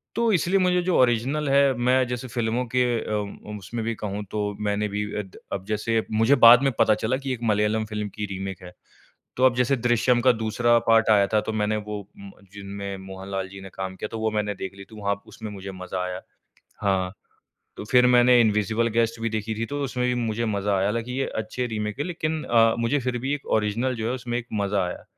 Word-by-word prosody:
तो 235 Hz, -1 st, +2 dB
इसलिए 185 Hz, +2 st, +2 dB
मुझे 180 Hz, -1 st, +2 dB
जो 180 Hz, 0 st, +1 dB
ओरिजिनल 130 Hz, +5 st, +2 dB
है 140 Hz, -1 st, +4 dB
मैं 125 Hz, +1 st, +3 dB
जैसे 125 Hz, +1 st, -4 dB
फ़िल्मों 120 Hz, 0 st, -1 dB
के 125 Hz, -, +4 dB, 0.2 s
अ, 105 Hz, 0 st, -5 dB
उसमे 105 Hz, +4 st, -6 dB
भी 115 Hz, +1 st, -2 dB
कहूँ 105 Hz, -1 st, -4 dB
तो 105 Hz, -1 st, -1 dB, 0.2 s
मैंने 105 Hz, +1 st, 0 dB
भी 105 Hz, +1 st, -2 dB, 0.2 s
अद 95 Hz, -3 st, -8 dB, 0.2 s
अब 95 Hz, -1 st, -4 dB
जैसे 110 Hz, +2 st, -1 dB
मुझे 115 Hz, +5 st, +4 dB
बाद 120 Hz, +3 st, +9 dB
में 135 Hz, -, +3 dB
पता 110 Hz, -, +5 dB
चला 125 Hz, +4 st, +1 dB
कि 135 Hz, 0 st, -6 dB
ये 130 Hz, -, 0 dB
एक 120 Hz, -, -11 dB
मलयालम 105 Hz, +1 st, +1 dB
फ़िल्म 105 Hz, -1 st, -4 dB
की 105 Hz, -, -3 dB
रीमेक 95 Hz, 0 st, -6 dB
है। 90 Hz, -, -10 dB, 0.7 s
तो 130 Hz, -, +1 dB
अब 130 Hz, -2 st, +4 dB
जैसे 125 Hz, +2 st, +2 dB
दृश्यम 120 Hz, +1 st, +2 dB
का 130 Hz, +1 st, +6 dB
दूसरा 120 Hz, +1 st, +2 dB
पार्ट 115 Hz, 0 st, +4 dB
आया 100 Hz, -2 st, +5 dB
था 110 Hz, -, +5 dB
तो 110 Hz, -, -4 dB
मैंने 105 Hz, 0 st, 0 dB
वो 105 Hz, -1 st, -4 dB, 0.2 s
म 100 Hz, 0 st, -10 dB, 0.2 s
जिनमे 100 Hz, 0 st, -6 dB
मोहन 95 Hz, 0 st, -9 dB
लाल 95 Hz, -1 st, -2 dB
जी 100 Hz, 0 st, -10 dB
ने 95 Hz, -, -9 dB
काम 95 Hz, -1 st, -5 dB
किया 105 Hz, -, -5 dB
था, -, -, -3 dB
वो 110 Hz, 0 st, -1 dB
मैंने 105 Hz, -1 st, -1 dB
देख 95 Hz, 0 st, -6 dB
ली 100 Hz, -, -10 dB
थी 110 Hz, -, -15 dB
वहाँ 100 Hz, 0 st, -1 dB
उसमे 110 Hz, -1 st, -8 dB
मुझे 100 Hz, -1 st, -7 dB
मज़ा 95 Hz, 0 st, -5 dB
आया। 90 Hz, 0 st, -5 dB, 0.6 s
हाँ, 95 Hz, -2 st, +1 dB, 0.6 s
तो -, -, -6 dB
फिर 125 Hz, -1 st, +6 dB
मैंने 125 Hz, 0 st, +6 dB
इनविजिबल 110 Hz, +1 st, +2 dB
गेस्ट 115 Hz, 0 st, +1 dB
भी 115 Hz, -, 0 dB
देखी 110 Hz, 0 st, -3 dB
थी, 115 Hz, +1 st, -3 dB
तो 145 Hz, +2 st, -4 dB
उसमे 125 Hz, -2 st, -1 dB
भी 125 Hz, -, +1 dB
मुझे 115 Hz, -1 st, -1 dB
मज़ा 100 Hz, -2 st, 0 dB
आया, 95 Hz, +1 st, +1 dB
हालाँकि 115 Hz, +4 st, -2 dB
ये -, -, 0 dB, 0.2 s
अच्छे 125 Hz, +3 st, -4 dB
रीमेक 105 Hz, -1 st, -4 dB
हैं 145 Hz, -, -1 dB
लेकिन 160 Hz, -3 st, -2 dB
अ, 115 Hz, -1 st, +4 dB
मुझे 115 Hz, +5 st, +1 dB
फिर 125 Hz, -1 st, -2 dB
भी 135 Hz, +4 st, -1 dB
एक 145 Hz, -, -8 dB
ओरिजिनल 115 Hz, +5 st, -1 dB
जो 110 Hz, 0 st, -2 dB
है 125 Hz, -, -1 dB
उसमे 120 Hz, -2 st, -3 dB
एक 120 Hz, -, -6 dB
मज़ा 100 Hz, -2 st, 0 dB
आया 90 Hz, -, -7 dB
110 Hz, 230 wpm, -24 LUFS, 105-125 Hz, 0.7 s, बाद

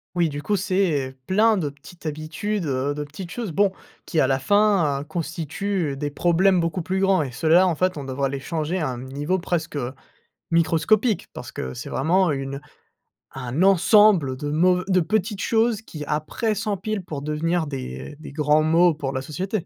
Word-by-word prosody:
Oui, 170 Hz, -2 st, +2 dB
du 145 Hz, 0 st, -6 dB
coup, 205 Hz, -, +1 dB
c'est, 185 Hz, -8 st, +1 dB
heu, 130 Hz, -, -16 dB
plein 215 Hz, -, +3 dB
de 150 Hz, -5 st, -1 dB
petites 145 Hz, +5 st, -16 dB
habitudes, 155 Hz, +6 st, -3 dB
heu, 135 Hz, +1 st, 0 dB
de 150 Hz, 0 st, -4 dB
petites 170 Hz, +5 st, -9 dB
choses, 230 Hz, -5 st, -4 dB
bon, 195 Hz, +4 st, +3 dB, 0.3 s
qui, 160 Hz, -, -1 dB
à 130 Hz, -, +4 dB
la 135 Hz, 0 st, +2 dB
fin, 175 Hz, -3 st, +2 dB
heu, -, -, -6 dB
constituent 165 Hz, 0 st, -3 dB
des 145 Hz, 0 st, -3 dB
problèmes 175 Hz, +4 st, +3 dB
beaucoup 165 Hz, +1 st, -1 dB
plus 190 Hz, +2 st, -1 dB
grands 190 Hz, -4 st, +3 dB
et 130 Hz, -, -5 dB
ceux-là, 160 Hz, +8 st, +4 dB
en 175 Hz, -, +2 dB
fait, 185 Hz, +1 st, 0 dB
on 145 Hz, -, -5 dB
devrait 135 Hz, +1 st, -2 dB
les 140 Hz, 0 st, -4 dB
changer 160 Hz, +4 st, -2 dB
à 155 Hz, -6 st, -1 dB
un 125 Hz, -1 st, -5 dB
niveau 145 Hz, +8 st, -2 dB
presque 170 Hz, -3 st, -2 dB, 0.8 s
microscopique, 180 Hz, +7 st, +2 dB
parce -, -, -8 dB
que 65 Hz, 0 st, -5 dB
c'est -, -, -7 dB
vraiment 175 Hz, +6 st, +2 dB
une 140 Hz, -1 st, -3 dB, 0.7 s
un 130 Hz, +5 st, -2 dB
ensemble 195 Hz, -, +5 dB
de 145 Hz, -, -4 dB
de -, -, -2 dB
mauv 180 Hz, +4 st, +3 dB
de 185 Hz, -1 st, +3 dB
petites 200 Hz, +4 st, -1 dB
choses 225 Hz, -1 st, +1 dB
qui, 155 Hz, -9 st, -8 dB
après, 155 Hz, +10 st, -1 dB
s'empilent 205 Hz, -1 st, -3 dB
pour 145 Hz, -5 st, -6 dB
devenir 160 Hz, +3 st, 0 dB
des 130 Hz, -, -6 dB
des 155 Hz, -, -9 dB
grands 150 Hz, +1 st, +3 dB
maux 165 Hz, +2 st, +4 dB
pour 140 Hz, -3 st, -4 dB
la 130 Hz, -, -2 dB
société. 185 Hz, +6 st, -3 dB
165 Hz, 190 wpm, -23 LUFS, 145-190 Hz, 0.8 s, ensemble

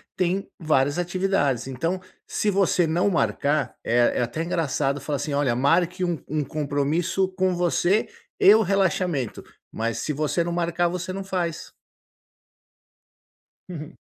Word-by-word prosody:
tem 185 Hz, +2 st, -1 dB
várias 145 Hz, -3 st, +1 dB
atividades. 175 Hz, -8 st, 0 dB
Então, 165 Hz, +8 st, -2 dB, 0.3 s
se 210 Hz, -, -1 dB
você 185 Hz, -3 st, +2 dB
não 175 Hz, +5 st, +2 dB
marcar, 140 Hz, -, 0 dB
é 120 Hz, +1 st, +3 dB
é -, -, +2 dB
até 120 Hz, +6 st, -2 dB
engraçado 145 Hz, -4 st, -1 dB
falar 145 Hz, -2 st, -2 dB
assim 145 Hz, -, -3 dB
olha 140 Hz, -4 st, +2 dB
marque 175 Hz, +7 st, +2 dB
um 170 Hz, -3 st, -2 dB
um 155 Hz, +1 st, -1 dB
compromisso 150 Hz, +6 st, 0 dB
com 185 Hz, 0 st, +2 dB
você 175 Hz, +3 st, +1 dB, 0.3 s
e 200 Hz, -, +8 dB
o 220 Hz, -, +4 dB
relaxamento, 185 Hz, -, 0 dB, 0.3 s
mas, 115 Hz, 0 st, -2 dB
se 150 Hz, -, -2 dB
você 150 Hz, +4 st, 0 dB
não 170 Hz, -, -3 dB
marcar, 170 Hz, 0 st, +1 dB
você 180 Hz, +1 st, -4 dB
não 195 Hz, +1 st, -4 dB
faz. 175 Hz, -4 st, -3 dB, 2.0 s
Uhum. 160 Hz, -2 st, -8 dB
170 Hz, 140 wpm, -24 LUFS, 145-180 Hz, 2.0 s, e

